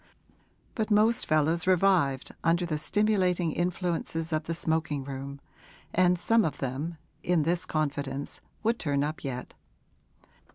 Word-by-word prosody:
But 220 -2 -2
most 220 +3 +3
fellows 160 +3 +2
revived 180 -8 +3
under 170 +2 +2
the 155 -3 -2
stimulating 185 -3 +2
influences 170 -1 -2
of 155 0 0
the 165 - -2
smoking 160 -4 -1
room, 140 +1 -6 0.5
and 180 0 +4
some 225 +5 +3
of 155 - -2
them, 145 +6 -3 0.2
in 175 -3 +2
this 170 +3 +1
confidence, 145 -2 -2 0.2
would 230 +2 +1
turn 140 -3 0
up 155 +2 -4
yet. 125 -3 -5
165 Hz, 130 wpm, -28 LUFS, 145-180 Hz, 0.5 s, and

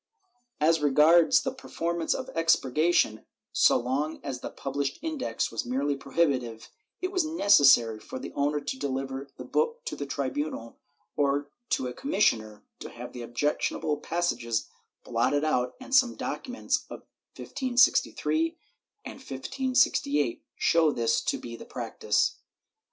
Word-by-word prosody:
^ - - -64 0.6
As 160 +2 +3
regards 160 - +5
the 265 - -2
performance 170 -10 -2
of 260 - -5
expurgation, 160 -6 +2 0.3
so - - +5
long 140 +6 -2
as 135 -3 -4
the - - -6
pub 135 - -7
lished 140 -1 -1
Index 300 - -2
was 115 - -2
merely 140 +4 -1
prohibitive, 135 -6 -1 0.3
it 370 - -1
was 370 -3 +1
necessary 145 - +5
for 110 - -8
the - - -7
owner 145 +1 0
to 140 -2 -5
deliver 135 0 -3
the - - -8
book 470 +1 -1
to - - -4
the 145 - -5
tribunal 140 -3 -4 0.4
or 145 0 0 0.2
to - - 0
a 125 - -4
commissioner 115 - 0 0.2
to - - -7
have - - -9
the 125 - -7
objectionable 145 +4 -1
passages 120 -10 -1 0.4
blotted 125 +5 +1
out 125 -5 0
and 265 +1 -9
some 260 -3 +5
documents 255 -1 -2
of - - -8 0.4
1563 280 +5 +1 0.5
and - - -7
1568 150 - 0
show 165 -2 +3
this 115 -3 +1
to - - -1
be 115 -1 -8
the - - -10
practice. 450 -1 -1
145 Hz, 140 wpm, -27 LUFS, 130-210 Hz, 0.6 s, regards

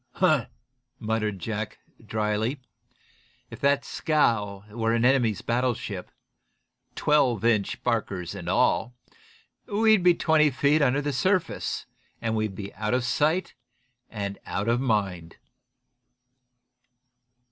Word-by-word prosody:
"Humph!" - - +2 0.5
muttered 110 -2 -1
Jack, 105 +3 -4 0.3
dryly, 110 +5 -1 0.9
"if 115 - -9
that 140 0 +2
scow 105 -10 0
were 115 +1 0
an 115 +1 +2
enemy's 125 -6 +2
battleship, 120 -6 -2 0.9
twelve 125 -7 +2
inch 110 -4 +1
barkers 100 -7 -1
and - - -6
all, 120 +2 +1 0.7
we'd 215 -1 +4
be 175 -1 +5
twenty 160 -3 +3
feet 145 +3 +2
under 140 +1 +2
the 145 0 -1
surface, 185 +6 0 0.3
and 115 -1 -1
we'd 110 -3 -1
be 100 0 -7
out 105 +3 -1
of 125 - 0
sight 155 +8 +1 0.6
and 100 -2 -5
out 100 +3 -2
of 120 +2 +2
mind." 95 -9 -1
115 Hz, 115 wpm, -26 LUFS, 105-140 Hz, 0.9 s, be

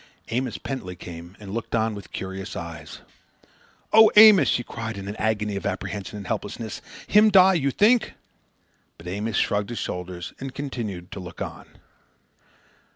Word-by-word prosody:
Amos 125 0 -2
Pentley 95 -10 -6
came 85 +1 -10
and 100 -2 -9
looked 115 +1 -3
on 110 -1 +1
with 100 -4 -10
curious 95 +1 -6
eyes. 85 -4 -8 0.9
"Oh, 220 0 +9
Amos!" 210 - +9
she 120 - +1
cried 115 -2 -6
in 100 0 -7
an 100 - -5
agony 105 -2 -1
of 100 - -4
apprehension 105 0 -4
and 100 - -8
helplessness, 105 +4 -4 0.2
"him 210 +1 +5
die, 190 -2 +7
you 140 -6 +1
think?" 215 - +3 0.8
But 85 - -15
Amos 100 +4 -3
shrugged 105 +1 0
his 120 - -5
shoulders 90 -1 -5
and 135 -1 -7
continued 110 -11 -5
to - - -6
look 90 -2 -9
on. - - -6
105 Hz, 160 wpm, -24 LUFS, 95-130 Hz, 0.9 s, Oh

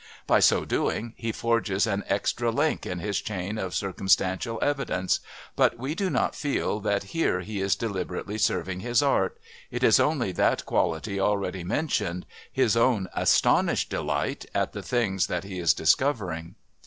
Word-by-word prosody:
By - - +4
so - - +4
doing 115 +1 -1
he 115 -1 -3
forges 110 -4 +1
an 100 -2 -1
extra 115 +4 0
link 145 +7 0
in 90 - -3
his 100 +3 -2
chain 105 -2 -4
of 95 -3 -3
circumstantial 95 +3 +1
evidence, 135 -11 0 0.4
but 120 - +3
we 135 +5 -3
do 190 +2 -1
not - - 0
feel 140 -7 -1
that 100 -1 0
here 165 - +1
he 100 +1 -5
is 95 -1 +2
deliberately 100 0 -4
serving 90 -3 0
his 120 +6 +1
art 145 - +1 0.3
it - - -4
is - - +6
only 135 -10 +1
that 90 - +1
quality 100 +5 0
already 95 -2 0
mentioned, 90 - -1 0.3
his 125 -4 +2
own 115 -5 +2
astonished - - +2
delight - - -2
at - - 0
the - - -5
things 100 -7 0
that - - -2
he 95 -2 -6
is 85 -2 +4
discovering. 90 - 0
105 Hz, 160 wpm, -26 LUFS, 95-120 Hz, 0.4 s, is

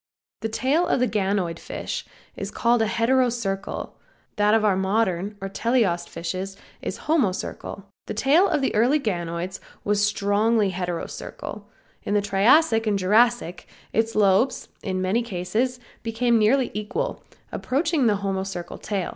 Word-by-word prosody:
The 225 - -3
tail 270 +10 +1
of - - +2
the 250 - +3
ganoid 190 -5 -1
fish - - -5 0.3
is - - -5
called 235 0 +2
heterocercal, 230 -3 0 0.4
that 210 +1 +4
of 220 -1 +2
our 200 -3 +4
modern 195 0 0
or 195 - -4
teleost 200 -3 +1
fishes 185 +4 -5 0.2
is - - -5
homocercal. 225 - -1 0.2
The - - -4
tail 295 - +4
of 300 -5 +1
all - - +3
early 240 +7 +4
ganoids 175 - -3 0.2
was 205 0 +1
strongly 210 +1 +2
heterocercal. 180 -2 -5 0.4
In 205 - -2
the 205 - +3
Triassic 225 +4 +4
and 205 -2 +2
Jurassic 210 -1 +2 0.3
its 225 0 +1
lobes 210 +5 +2
in 185 -2 -2
many 195 +6 +1
cases 230 +5 -2 0.2
became 230 +1 +1
nearly 245 +5 +3
equal, 215 - -3 0.3
approaching 290 0 +1
the 210 -2 +3
homocercal 190 -3 -4
tail. 195 -4 -2
210 Hz, 140 wpm, -24 LUFS, 195-240 Hz, 0.4 s, that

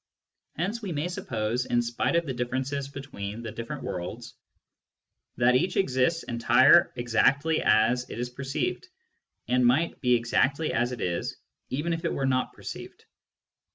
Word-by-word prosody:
Hence 200 +8 -2
we 200 -4 -4
may 150 +3 -1
suppose, 115 -6 -2
in 120 0 +2
spite 120 +7 -1
of 170 0 +2
the 135 - -3
differences 130 +3 -2
between 120 -6 -7
the 115 - -5
different 115 +1 -6
worlds, 115 +7 -5 1.0
that 120 +1 +4
each 160 +8 +1
exists 165 -1 +1
entire 115 -1 +5
exactly 135 +6 +2
as 115 +4 +3
it - - -7
is 125 +1 -3
perceived, 135 +2 -3 0.6
and 125 +1 +2
might 130 +8 +2
be 125 -2 +4
exactly 130 +6 +1
as 120 +1 +1
it 125 - -6
is 85 -1 -2 0.3
even 150 +6 -1
if 165 +1 -4
it 165 - 0
were 135 - -1
not 130 -1 +1
perceived. - - -9
125 Hz, 155 wpm, -27 LUFS, 120-145 Hz, 1.0 s, entire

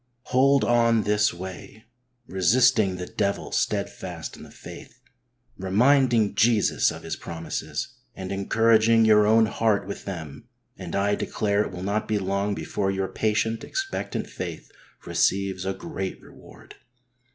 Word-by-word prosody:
Hold 135 +2 +4
on 115 -2 +3
this 105 0 +2
way, 95 +5 -9 0.4
resisting 110 +1 +3
the 90 0 -5
devil 100 +2 -2
steadfast - - -3
in - - -14
the - - -12
faith, - - -12 0.6
reminding 115 +2 +3
Jesus 115 -1 +3
of - - -8
His - - -4
promises 85 0 -5 0.3
and 95 0 -6
encouraging 110 +3 +3
your 105 -1 +5
own 110 +1 +5
heart 110 -2 0
with 100 - -7
them, 85 0 -7 0.3
and 90 -3 -7
I 100 +1 +1
declare 100 0 0
it 105 - -3
will 90 0 -7
not 100 +2 -1
be 110 - 0
long 100 +1 -1
before 95 -2 -2
your 95 0 -2
patient, 110 +1 -1
expectant 390 0 -3
faith - - -7 0.3
receives 95 -1 0
a 95 - 0
great 95 0 -5
reward. - - -16
105 Hz, 140 wpm, -25 LUFS, 95-115 Hz, 0.6 s, your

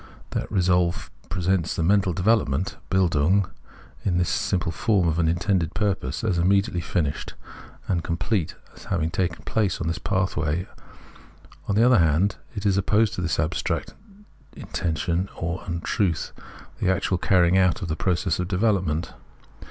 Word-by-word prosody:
That - - -3
resolve 90 -2 +1 0.2
presents 90 -1 0
this 80 - 0
mental 95 0 +3
development, 90 -4 +1
(Bildung) 90 +1 +3 0.6
in 90 -3 +1
the 90 - +2
simple 90 0 0
form 100 -3 +1
of 80 0 0
an 80 - +3
intended 85 0 0
purpose, 95 - -1
as 95 -6 +1
immediately 95 0 +2
finished 80 -3 -2 0.5
and 85 -3 0
com 85 0 -2
plete, 95 -3 -1 0.2
as - - -14
having 85 -5 -1
taken 90 -2 -2
place; 105 -5 0
this 85 -2 -2
pathway, 90 -3 -1 1.0
on 100 - 0
the 110 - +5
other 125 -2 +6
hand, 85 +5 +2 0.2
is, 100 0 -5
as 100 -2 +3
opposed 105 +2 +2
to - - -3
this 85 -2 -1
abstract 85 +1 -1 0.6
in - - -9
tention, 85 +2 -1
or 85 +2 -3
untruth, 85 +1 -1 0.5
the - - +1
actual 95 0 +1
carrying 90 -1 +3
out 90 0 +2
of - - -3
that 80 -1 -2
process 90 -1 0
of 90 - -1
development. 90 -5 0
90 Hz, 150 wpm, -24 LUFS, 85-95 Hz, 1.0 s, other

